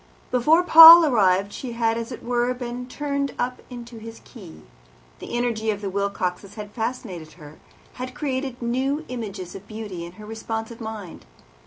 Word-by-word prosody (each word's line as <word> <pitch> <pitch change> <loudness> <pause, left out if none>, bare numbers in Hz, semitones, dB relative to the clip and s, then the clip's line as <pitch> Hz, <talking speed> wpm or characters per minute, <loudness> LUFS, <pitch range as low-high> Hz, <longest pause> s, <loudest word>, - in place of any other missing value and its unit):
Before 305 +8 +3
Paul 330 0 +11
arrived 200 -6 +2
she 250 -3 -6
had, 230 -1 0
as 230 +2 -5
it 245 - -9
were, 240 0 0
been 245 0 -6
tuned 280 0 -3
up 250 +1 -3
into 240 -2 -10
his 225 +1 -10
key. 190 -9 -13 0.6
The - - -5
energy 230 -2 -1
of 205 -2 -1
the 200 -2 -4
Wilcoxes 200 0 -3
had 210 -2 -8
fascinated 220 -9 -5
her, 150 -2 -14 0.4
had 255 +1 -6
created 265 -4 -4
new 265 +6 -1
images 205 -7 -6
of 195 +1 -11
beauty 210 -5 -7
in 170 +1 -10
her 210 +3 -12
responsive 225 +1 -6
mind. 215 - -8
230 Hz, 165 wpm, -23 LUFS, 205-255 Hz, 0.6 s, Paul